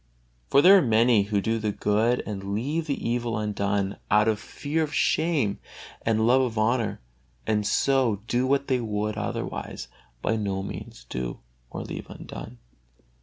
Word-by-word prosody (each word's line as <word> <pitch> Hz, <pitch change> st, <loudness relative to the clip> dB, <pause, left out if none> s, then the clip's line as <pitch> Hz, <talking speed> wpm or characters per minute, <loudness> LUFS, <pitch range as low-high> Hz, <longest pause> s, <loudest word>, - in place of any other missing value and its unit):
For 140 Hz, -, +5 dB
there 195 Hz, +2 st, +9 dB
are -, -, +2 dB
many 115 Hz, -3 st, +4 dB
who 100 Hz, -1 st, 0 dB
do 115 Hz, +2 st, 0 dB
the 105 Hz, -1 st, -1 dB
good 110 Hz, +4 st, +1 dB
and 100 Hz, -1 st, -4 dB
leave 150 Hz, +9 st, -2 dB
the 140 Hz, -, -2 dB
evil 120 Hz, -1 st, -1 dB
undone 100 Hz, -2 st, -1 dB
out 105 Hz, +1 st, +4 dB
of 110 Hz, -2 st, +1 dB
fear 150 Hz, +7 st, -3 dB
of 155 Hz, -2 st, -1 dB
shame 150 Hz, -11 st, +1 dB, 0.4 s
and 110 Hz, -1 st, +2 dB
love 125 Hz, +3 st, +5 dB
of 120 Hz, -4 st, -1 dB
honor, 110 Hz, -, +1 dB, 0.4 s
and 105 Hz, -1 st, +1 dB
so 125 Hz, -7 st, +2 dB
do 125 Hz, +2 st, +1 dB
what 140 Hz, +1 st, +1 dB
they 130 Hz, -2 st, +2 dB
would 105 Hz, -2 st, -2 dB
otherwise 105 Hz, -1 st, -4 dB, 0.3 s
by 110 Hz, -, +1 dB
no 100 Hz, -2 st, -2 dB
means -, -, -8 dB
do 60 Hz, 0 st, -4 dB, 0.3 s
or -, -, -5 dB
leave -, -, -7 dB
undone. 60 Hz, -, -9 dB
110 Hz, 165 wpm, -26 LUFS, 105-125 Hz, 0.4 s, there